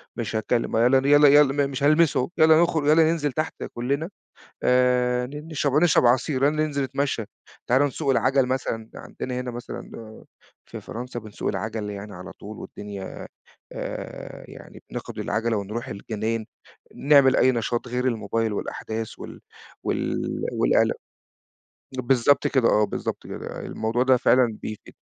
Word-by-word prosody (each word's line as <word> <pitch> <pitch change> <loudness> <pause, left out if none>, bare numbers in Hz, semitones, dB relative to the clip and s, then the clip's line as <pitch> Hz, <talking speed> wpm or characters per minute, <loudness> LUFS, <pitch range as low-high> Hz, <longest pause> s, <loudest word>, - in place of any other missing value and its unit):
مش 115 -2 -4
هتكلم. 115 +1 0
يالّا 125 +3 +5
ن 135 - -4
يالّا 145 +1 +7
يالّا 145 0 +5
م - - -4
مش 135 +1 -4
هالمسه، 155 -3 +3
يالّا 160 +1 +6
نخرج، 160 -4 +1
يالّا 160 +2 +6
ننزل 150 -4 -1
تحت 155 +5 -3
كلنا 140 +8 -2 0.5
آآ، 125 0 +2
ن 150 +4 -9
نش 150 -2 -2
ونشرب 150 -1 +4
عصير، 130 +2 +2
يالّا 150 +2 +2
ننزل 150 -2 0
نتمشى. 135 -4 -1 0.4
تعالوا 130 +4 +3
نسوق 140 0 -2
العجل 130 0 +3
مثلًا." 115 -3 -3
عندنا 125 0 -6
هنا 125 - -4
مثلًا 120 0 -8 0.8
في - - -8
فرنسا 120 +1 -6
بنسوق 110 -2 -5
العجل 105 +1 -3
يعني 100 0 -8
على 90 +1 -9
طول 105 +1 -10
والدنيا 100 -2 -8 0.5
آآ، - - -7
يعني - - -13
بناخد - - -7
العجلة 115 -1 -1
ونروح 105 +4 -5
الجنا 105 +1 -5
ين 115 -1 -1 0.5
نعمل 140 -2 +5
أي 130 - +4
نشاط 120 +1 -2
غير 125 +1 -2
الموبايل 115 -1 -1
والأحداث 110 +2 -5
وال - - -9 0.4
وال - - -1 0.3
والقلق. - - +2 1.0
بالضبط 130 +2 +3
كده 130 -4 +3
آه، 105 0 +4
بالضبط - - -5
كده. - - -7
الموضوع 115 +3 -1
ده 130 0 +4
فعلًا 120 -3 +3
بيفيد. 110 -1 -8
125 Hz, 150 wpm, -24 LUFS, 115-140 Hz, 1.0 s, يالّا